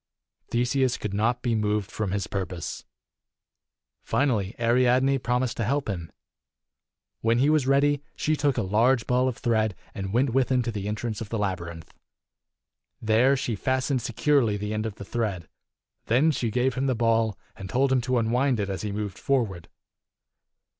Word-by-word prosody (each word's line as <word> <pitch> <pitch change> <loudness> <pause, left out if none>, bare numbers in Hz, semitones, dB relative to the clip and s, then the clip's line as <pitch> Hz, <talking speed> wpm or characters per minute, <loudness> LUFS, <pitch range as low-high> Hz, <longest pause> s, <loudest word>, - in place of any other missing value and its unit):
Theseus 125 +1 +1
could 105 -2 -4
not 115 +5 0
be 120 -2 +1
moved 105 -2 0
from 110 -3 -2
his 100 +1 -1
pur 95 -2 -3
pose. 85 -3 -6 1.2
Finally 115 -8 0
Ariadne 125 +3 +3
promised 125 0 -1
to 115 - 0
help 140 +5 0
him. 85 -6 -4 1.1
When 115 +1 +2
he 140 +5 +3
was 150 -4 +2
ready, 140 +1 +3
she 155 - 0
took 140 -3 0
a 115 - +1
large 115 +5 +2
ball 125 +1 +2
of 125 - -2
thread 110 -5 +1 0.2
and 95 -1 -5
went 125 +4 +2
with 130 +1 +1
him 125 -1 +3
to 120 - -2
the 100 -2 -4
entrance 110 +1 -3
of 110 - -6
the 115 - -2
labyrinth. 85 -5 -4 1.1
There 115 +5 +3
she 120 -3 -2
fastened 130 +4 0
securely 120 -3 +1
the 105 +1 -4
end 110 +1 -1
of 105 - -7
the 100 - -9
thread. 100 -8 -3 0.6
Then 135 +8 +4
she 120 -5 -1
gave 125 +3 +1
him 135 +2 -1
the 130 - +1
ball, 115 -2 +1 0.2
and 95 -1 -8
told 135 +4 +2
him 130 -1 +3
to 125 +1 0
unwind 120 +2 +1
it 100 -1 -1
as 95 - -4
he 105 - -3
moved 100 -2 -4
forward. 110 - -1
115 Hz, 175 wpm, -26 LUFS, 105-130 Hz, 1.2 s, Then